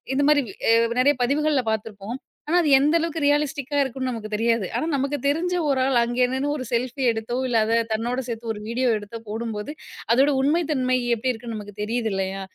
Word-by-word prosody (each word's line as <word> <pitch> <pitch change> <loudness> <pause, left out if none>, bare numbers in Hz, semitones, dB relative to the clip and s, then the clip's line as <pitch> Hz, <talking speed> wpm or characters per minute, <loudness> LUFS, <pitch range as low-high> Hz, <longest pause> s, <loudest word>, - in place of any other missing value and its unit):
இந்த 285 - +2
மாதிரி 295 -1 +5 0.3
அ - - +7 0.3
நெறைய 280 +3 +5
பதிவுகள்ல 285 +1 +1
பார்த்துருப்போம். 215 +1 -4 0.3
ஆனா 340 +3 +2
அது 310 - +1
எந்த 295 +4 +3
அளவுக்கு 330 0 -2
ரியலிஸ்டிக்கா 290 -1 0
இருக்கும்னு 260 0 -3
நமக்கு 220 -3 -6
தெரியாது. 230 -2 +1
ஆனா - - 0
நமக்கு 280 +2 -1
தெரிஞ்ச 340 +5 0
ஒரு 270 -2 +2
ஆள் 265 -2 +2
அங்க 240 +1 -1
நின்னு 270 +2 -1
ஒரு 260 - -4
செல்ஃபி 255 +3 -1
எடுத்தோ, 225 +1 -4
இல்லா 235 -3 +2
அத 225 +1 +1 0.2
தன்னோடு 240 +4 -1
சேர்த்து 230 -1 -5
ஒரு 210 - -8
வீடியோ 250 +3 0
எடுத்தோ 205 +2 -8
போடும்போது, 220 +2 -4 0.4
அதோட 265 +5 +5
உண்மை 300 +6 +2
தன்மை 255 -3 +1 0.2
எப்படி 255 +3 -1
இருக்குன்னு 230 0 -7
நமக்கு 205 -1 -9
தெரியுது 225 +1 -1
இல்லையா? 195 0 -2
250 Hz, 190 wpm, -24 LUFS, 225-285 Hz, 0.4 s, அ